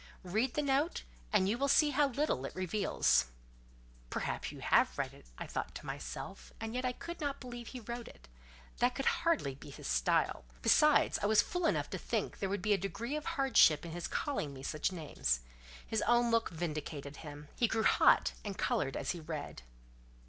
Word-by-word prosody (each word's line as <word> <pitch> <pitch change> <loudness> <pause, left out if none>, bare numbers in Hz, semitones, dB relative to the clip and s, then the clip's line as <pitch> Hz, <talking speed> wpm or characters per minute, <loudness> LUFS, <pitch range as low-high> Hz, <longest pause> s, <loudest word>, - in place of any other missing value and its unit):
"Read 220 +8 0
the 300 - +1
note, 285 +4 +1 0.3
and 195 -3 +3
you 225 +5 0
will 280 - +2
see 295 +2 +5
how 290 +1 +3
little 275 - 0
it 135 - -6
reveals." 185 - +2 0.8
"Perhaps - - -3
you - - -10
have - - +3
read - - -2
it," - - -16
I - - -5
thought - - -4
to - - -8
myself; - - -6
and 225 0 -4
yet 255 +1 -2
I 250 - +2
could 340 +7 -8
not 285 -2 -2
believe 240 -2 -8
he 255 - -7
wrote 235 +1 -6
it: 60 - -14 0.5
that 245 +1 +2
could 270 - -3
hardly 330 - +1
be 140 - -12
his 140 - -10
style: - - +1 0.2
besides, 300 -1 +5
I 205 - +2
was 215 0 +5
fool 355 -1 -1
enough - - 0
to - - -3
think - - -2
there 195 - -1
would 200 -1 -2
be 210 0 +3
a 200 - +1
degree 235 - -3
of 305 - -4
hardship 230 - +4
in 170 - -6
his 175 0 -4
calling 155 - -2
me 130 - -9
such 155 +6 -1
names. 145 - -1 0.4
His 220 - -1
own 240 0 +4
look 230 0 +2
vindicated 150 -3 -5
him; 145 -1 -9
he 235 - +3
grew 225 0 0
hot, - - +5
and 200 -2 -5
coloured 135 - 0
as - - -1
he 175 - -5
read. 155 - -6
220 Hz, 200 wpm, -33 LUFS, 160-265 Hz, 0.8 s, see